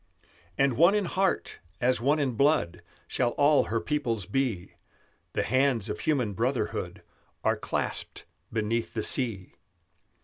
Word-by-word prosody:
"And 135 -4 +2
one 175 +7 +6
in 205 -2 +1
heart, 190 +2 -1 0.2
as 125 0 +1
one 145 +5 +3
in 140 -4 0
blood, 120 - +1 0.3
Shall 120 -2 0
all 145 +1 +4
her 115 - -1
peoples 120 -8 -2
be; 110 -5 -2 0.6
The - - 0
hands 130 -3 +1
of 105 - -4
human 130 -9 0
brotherhood - - -2 0.4
Are - - +2
clasped - - -3 0.3
beneath 115 +1 -2
the 110 - -1
sea. 115 -9 0
125 Hz, 135 wpm, -28 LUFS, 110-145 Hz, 0.6 s, one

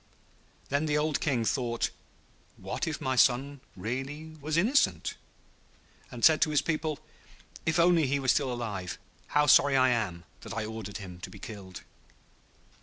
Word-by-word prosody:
Then 145 +3 0
the 150 0 +1
old 150 0 0
King 125 -6 0
thought, 120 0 0 0.7
'What - - -4
if - - -3
my 130 0 -1
son 135 +3 +3
really 135 +10 -5
was 155 +2 -1
innocent?' 240 +11 +2 1.0
and 120 -2 0
said 160 -1 +6
to 155 - +4
his 150 -1 +2
people, 155 -2 -1 0.7
'If 160 +1 +2
only 170 -3 +4
he 140 +2 +1
were 135 - -4
still 135 0 +3
alive! 105 -8 -4 0.3
How 150 0 +3
sorry 140 -1 +6
I 130 0 +5
am 105 -8 -1 0.2
that - - -8
I 110 - -1
ordered 110 -2 -6
him 90 -4 -9
to - - -7
be - - -12
killed.' 95 -3 -9
130 Hz, 160 wpm, -29 LUFS, 110-150 Hz, 1.0 s, said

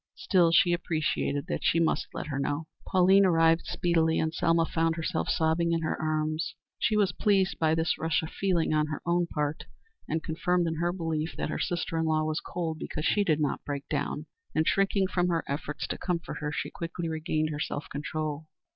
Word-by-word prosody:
Still, 175 -4 +3
she 175 +2 +5
appreciated 155 -4 -1
that - - -3
she 165 - +3
must 165 - +1
let - - -5
her 140 -2 -3
know. 145 +3 -1 0.2
Pauline 190 +2 +5
arrived 165 -2 +4
speedily, 165 -2 +1
and 160 0 0
Selma 165 -1 +2
found 165 0 0
herself 165 -1 -2
sobbing 165 +1 +2
in 165 0 0
her 155 - 0
arms. 155 0 -1 0.2
She 215 - +2
was 200 -3 +3
pleased 195 0 +1
by 160 -1 +3
this 160 0 0
rush 160 0 +1
of 160 - -6
feeling 180 -5 +1
on 155 0 +2
her 150 - -5
own 175 0 +2
part, 150 -1 -2 0.4
and, 160 +1 -1
confirmed 175 +2 0
in 165 -1 -2
her 170 +2 +1
belief 165 -3 -2
that - - -2
her - - -3
sister 165 -1 -1
in 160 - +1
law 155 -1 +2
was 155 0 -1
cold 165 -3 -4
because 155 - -4
she 205 - +3
did 160 -6 +2
not 150 -2 -1
break 140 -1 -5
down, - - -2 0.3
and, 160 - +3
shrinking 195 0 +2
from 180 -1 +1
her 165 -2 0
efforts 145 +1 -3
to - - -4
comfort 175 -2 -3
her, 150 -1 -3
she - - -3
quickly 170 0 -4
regained 155 -1 -1
her 150 - -4
self 145 0 -3
control. 155 +1 -4
165 Hz, 205 wpm, -28 LUFS, 155-175 Hz, 0.4 s, she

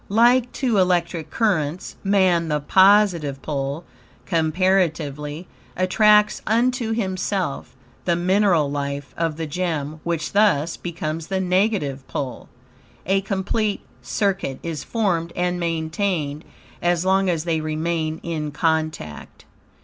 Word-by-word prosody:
Like 240 +4 +4
two 240 -7 +1
electric 175 -3 +1
currents, 175 -6 -1
MAN, 185 -4 +3
THE 150 -1 0
POSITIVE 185 -4 +4
POLE 140 +1 -3 0.4
(comparatively), 160 -2 0 0.3
attracts 210 +3 +4
unto 235 +1 +1
himself 190 -8 -2 0.3
THE 175 - +2
MINERAL 175 -4 +2
LIFE 140 -1 -4
OF 165 -2 -1
THE 165 - -3
GEM, 155 -2 -3
which 165 -2 -2
thus, 185 -7 +3
becomes 165 -2 -5
the 190 -1 -1
negative 180 -8 0
pole. 135 -3 -5 0.6
A 195 +2 +2
complete 200 +2 -1 0.2
circuit 195 -10 -1
is 160 -4 -4
formed 175 -7 -1
and 180 0 0
maintained, 165 -2 -2 0.4
as 175 0 +1
long 190 0 +3
as 165 -3 0
they 165 -2 0
remain 155 0 -2
in 155 -3 -3
contact. 155 - -2
170 Hz, 115 wpm, -22 LUFS, 155-195 Hz, 0.6 s, Like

